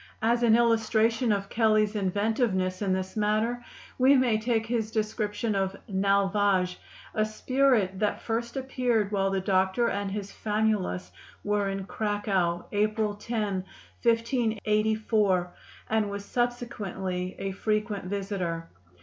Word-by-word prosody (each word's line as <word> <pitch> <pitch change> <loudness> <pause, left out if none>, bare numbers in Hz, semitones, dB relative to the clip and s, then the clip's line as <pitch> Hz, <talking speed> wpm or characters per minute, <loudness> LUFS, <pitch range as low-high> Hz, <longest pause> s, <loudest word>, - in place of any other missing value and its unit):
As 235 +2 +3
an 230 -2 +5
illustration 225 0 +2
of 200 -1 0
Kelley's 215 -2 +2
inventiveness 200 -1 0
in 195 -2 0
this 190 0 -3
matter, 215 +3 0 0.4
we 265 +2 +6
may 245 -5 +3
take 225 0 0
his 225 -2 -1
description 215 0 -1
of 195 -1 -1
"Nalvage," 195 -2 +2 0.3
a 215 - +2
spirit 215 -3 +1
that 210 - 0
first 235 +3 -2
appeared 250 -5 0
while 195 -1 +1
the 195 0 0
doctor 190 +4 +2
and 200 0 -2
his 200 0 -5
famulus 210 - -1 0.3
were 205 -1 0
in 195 -1 -4
Cracow, 195 -5 -1
April 215 0 +1
10, 210 -3 -2 0.4
1584, 220 -5 +1 0.4
and 220 -2 +2
was 200 0 -5
subsequently 200 -7 -3
a 195 - -3
frequent 210 0 -1
visitor. 185 -4 -3
210 Hz, 125 wpm, -27 LUFS, 195-225 Hz, 0.4 s, we